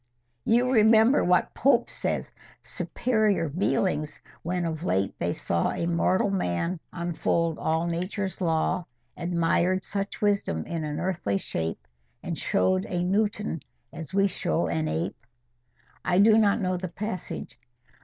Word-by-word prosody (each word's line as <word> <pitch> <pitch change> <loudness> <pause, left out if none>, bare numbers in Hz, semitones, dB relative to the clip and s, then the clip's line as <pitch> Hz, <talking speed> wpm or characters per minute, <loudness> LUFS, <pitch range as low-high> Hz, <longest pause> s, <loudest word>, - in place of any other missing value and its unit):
You 245 +3 +3
remember 220 +3 +5
what 180 0 +2
Pope 275 +4 +3
says,— - - -3 0.3
'Superior 215 -9 0
beings, 155 -1 0 0.2
when 175 +1 -2
of 160 -1 -3
late 95 - 0
they 85 - 0
saw 85 -1 0
A - - -2
mortal 175 +3 +2
man 170 - -1
unfold 170 -1 -1
all 160 +1 0
Nature's 185 +3 -3
law, 165 +1 +1 0.3
Admired 175 +1 +1
such 200 0 -3
wisdom 200 - 0
in 165 -2 -3
an 150 0 -3
earthly 165 - -1
shape, 80 -8 -4 0.4
And - - -3
show'd 95 +1 +1
a 175 -1 -1
Newton 205 -3 0 0.3
as 160 -3 -8
we 195 +1 +3
show 85 - -1
an 80 -2 -1
ape'?" 80 +9 -3 0.8
"I 180 - +1
do 215 +2 +7
not 215 -1 +4
know 185 -1 0
the 185 +1 -4
passage. 185 - -6
175 Hz, 135 wpm, -27 LUFS, 155-200 Hz, 0.8 s, do